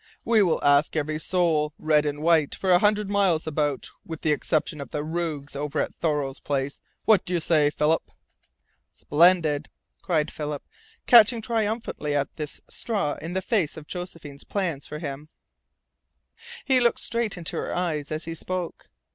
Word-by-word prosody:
"We 230 Hz, -2 st, +4 dB
will 175 Hz, -5 st, +1 dB
ask 145 Hz, +2 st, +4 dB
every 155 Hz, 0 st, -1 dB
soul 160 Hz, -4 st, +1 dB
red 150 Hz, -1 st, +2 dB
and 145 Hz, +1 st, -3 dB
white 160 Hz, -3 st, +3 dB
for 190 Hz, -, 0 dB
a 175 Hz, -, +6 dB
hundred 210 Hz, +1 st, +2 dB
miles 195 Hz, -5 st, +2 dB
about, 145 Hz, -3 st, -2 dB
with 160 Hz, -1 st, -7 dB
the 155 Hz, -, +1 dB
exception 150 Hz, 0 st, 0 dB
of 140 Hz, -, -8 dB
the 150 Hz, -, -3 dB
rogues 155 Hz, -3 st, -3 dB
over 145 Hz, 0 st, -3 dB
at -, -, -1 dB
Thoreau's 145 Hz, -4 st, -1 dB
Place! 140 Hz, -1 st, -2 dB, 0.3 s
What 220 Hz, -3 st, +5 dB
do 180 Hz, -, -2 dB
you -, -, +2 dB
say, 155 Hz, -2 st, +3 dB
Philip?" 150 Hz, +2 st, +1 dB, 0.9 s
"Splendid!" 155 Hz, -2 st, +3 dB, 0.3 s
cried 160 Hz, -4 st, 0 dB
Philip, 150 Hz, -2 st, -5 dB, 0.4 s
catching 235 Hz, 0 st, +7 dB
triumphantly 220 Hz, -9 st, -2 dB
at 140 Hz, -1 st, -1 dB
this 150 Hz, -2 st, -6 dB
straw 200 Hz, -11 st, -2 dB
in 165 Hz, +3 st, -5 dB
the 190 Hz, 0 st, -1 dB
face 185 Hz, -8 st, 0 dB
of 155 Hz, -, -9 dB
Josephine's 165 Hz, -5 st, -8 dB
plans 170 Hz, -8 st, -3 dB
for 150 Hz, -, -6 dB
him. 150 Hz, -1 st, -6 dB, 1.4 s
He 265 Hz, -2 st, +4 dB
looked 240 Hz, -1 st, +2 dB
straight 230 Hz, -4 st, 0 dB
into 170 Hz, -2 st, -6 dB
her -, -, -3 dB
eyes 155 Hz, -5 st, -2 dB
as 155 Hz, +1 st, -3 dB
he 165 Hz, -, -4 dB
spoke. 180 Hz, +1 st, -5 dB
160 Hz, 165 wpm, -25 LUFS, 150-185 Hz, 1.4 s, catching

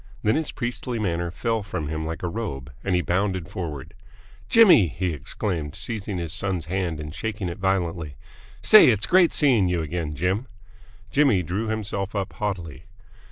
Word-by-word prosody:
Then 105 Hz, -, +3 dB
his 160 Hz, +3 st, -1 dB
priestly 120 Hz, 0 st, -4 dB
manner 85 Hz, -5 st, -1 dB
fell 115 Hz, +5 st, -1 dB
from 95 Hz, -6 st, -4 dB
him 80 Hz, +1 st, -3 dB
like 80 Hz, +2 st, -5 dB
a -, -, 0 dB
robe, 70 Hz, -, -5 dB
and 95 Hz, -2 st, +1 dB
he 90 Hz, -, +2 dB
bounded 95 Hz, -1 st, -1 dB
forward. 75 Hz, -7 st, -6 dB, 0.6 s
"Jimmy!" 200 Hz, -, +7 dB
he 90 Hz, +3 st, -2 dB
exclaimed, 80 Hz, 0 st, -4 dB
seizing 105 Hz, -4 st, -4 dB
his 85 Hz, -2 st, -3 dB
son's 95 Hz, -5 st, -2 dB
hand 90 Hz, -2 st, -2 dB
and 75 Hz, 0 st, -6 dB
shaking 105 Hz, -1 st, -3 dB
it 85 Hz, -, -7 dB
violently. 85 Hz, -6 st, -1 dB, 0.5 s
"Say, 215 Hz, -, +9 dB
it's 105 Hz, -4 st, +3 dB
great 180 Hz, -2 st, +5 dB
seeing 125 Hz, -, +3 dB
you 90 Hz, -2 st, 0 dB
again, 80 Hz, -1 st, -3 dB
Jim!" 95 Hz, -, -1 dB, 0.6 s
Jimmy 135 Hz, -11 st, +3 dB
drew 95 Hz, +7 st, -2 dB
himself 105 Hz, -2 st, -3 dB
up 100 Hz, -2 st, -2 dB
haughtily. 90 Hz, -9 st, -4 dB
95 Hz, 165 wpm, -24 LUFS, 85-110 Hz, 0.6 s, Say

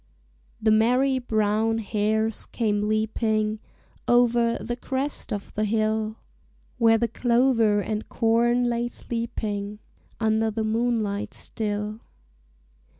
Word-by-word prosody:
The 220 Hz, 0 st, +2 dB
merry 250 Hz, +5 st, +3 dB
brown 220 Hz, -1 st, +1 dB
hares 220 Hz, 0 st, -1 dB
came 210 Hz, -3 st, 0 dB
leaping 215 Hz, 0 st, 0 dB, 0.5 s
Over, 240 Hz, -1 st, +3 dB
the 240 Hz, -, -4 dB
crest 265 Hz, +2 st, -3 dB
of 205 Hz, -2 st, -5 dB
the 215 Hz, -, -1 dB
hill, 215 Hz, 0 st, 0 dB, 0.6 s
Where 225 Hz, -1 st, +5 dB
the 235 Hz, +1 st, +1 dB
clover 235 Hz, -2 st, +2 dB
and 215 Hz, +1 st, -4 dB
corn 235 Hz, +1 st, +2 dB
lay 240 Hz, 0 st, 0 dB
sleeping, 210 Hz, -4 st, -4 dB, 0.4 s
Under 220 Hz, 0 st, +2 dB
the 220 Hz, +1 st, -2 dB
moonlight 220 Hz, -2 st, -1 dB
still. 210 Hz, 0 st, -4 dB
220 Hz, 105 wpm, -25 LUFS, 215-235 Hz, 0.6 s, Where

